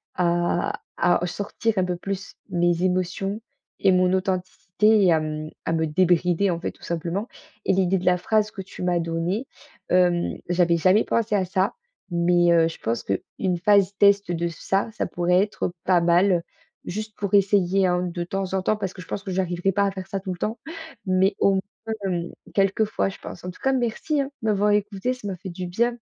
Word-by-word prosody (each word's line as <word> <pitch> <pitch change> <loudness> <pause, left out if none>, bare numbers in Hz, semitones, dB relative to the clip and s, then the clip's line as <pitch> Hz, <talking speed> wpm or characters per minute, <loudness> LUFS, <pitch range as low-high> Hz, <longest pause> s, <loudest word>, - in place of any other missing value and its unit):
à 175 -1 0 0.2
à 175 0 +3
au - - +1
sortir 205 +5 -2
un 185 - +3
peu 180 -1 -2
plus 195 +2 -5
mes 175 -1 +1
émotions 185 +3 -1 0.4
et 195 - +4
mon 185 0 +3
authenticité 190 +3 +1
et 180 - +5
à, 160 - +3
mmh, 155 0 -4 0.2
à - - 0
me 160 0 +1
débrider, 180 +3 +2
en 170 - -2
fait, - - -2
tout - - -22
simplement 170 +5 -3 0.4
et - - +3
l'idée 190 0 +2
de 180 - -7
la 180 0 +5
phrase 215 +3 +1
que 195 - -7
tu 190 0 -11
m'as 180 -1 +1
donnée, 170 +7 -2 0.4
hem, 180 -1 +2
j'avais 175 -1 +3
jamais 185 +6 +4
pensé 225 -2 0
à 195 - +2
ça 190 +1 0 0.4
mais, 175 0 +3
heu, 165 -1 +5
je 165 - -9
pense 115 +1 -2
qu'une 175 - -2
phase 200 0 +4
test 200 -2 +4
de 170 0 -1
ça, 195 +6 -1
ça - - -2
pourrait 180 +1 +2
être 205 -4 -3
pas 185 -2 +4
mal 175 +1 +3 0.4
juste 215 +3 -5
pour 200 -1 -3
essayer 195 -1 +3
hein 180 0 +1
de 175 - -2
temps 195 +1 -3
en 190 - +1
temps 215 - +1
parce 195 -3 -3
que 185 - -10
je 165 - -12
pense 200 - -4
que 195 - -5
j'arriverai 180 0 0
pas 200 +2 +2
à 200 - 0
faire 190 -1 -7
ça 195 - -3
tout 190 0 -5
le - - -9
temps. 220 +5 -2 0.5
Mais 185 +2 +3
au 200 - +4
moins, 200 +3 -5
hem, 175 -2 -2 0.2
quelques 195 +2 +3
fois, 210 - -1
je 195 - -10
pense - - -9
en 180 - -4
tout - - -18
cas, 270 - +3
merci 260 +4 -1
hein 275 - -2 0.2
de - - -1
m'avoir 210 0 +2
écoutée, 205 +3 0
ça 250 -4 -11
m'a 185 - -4
fait 190 +2 -8
du 180 +1 -5
bien. 235 +7 0
185 Hz, 215 wpm, -24 LUFS, 175-200 Hz, 0.5 s, et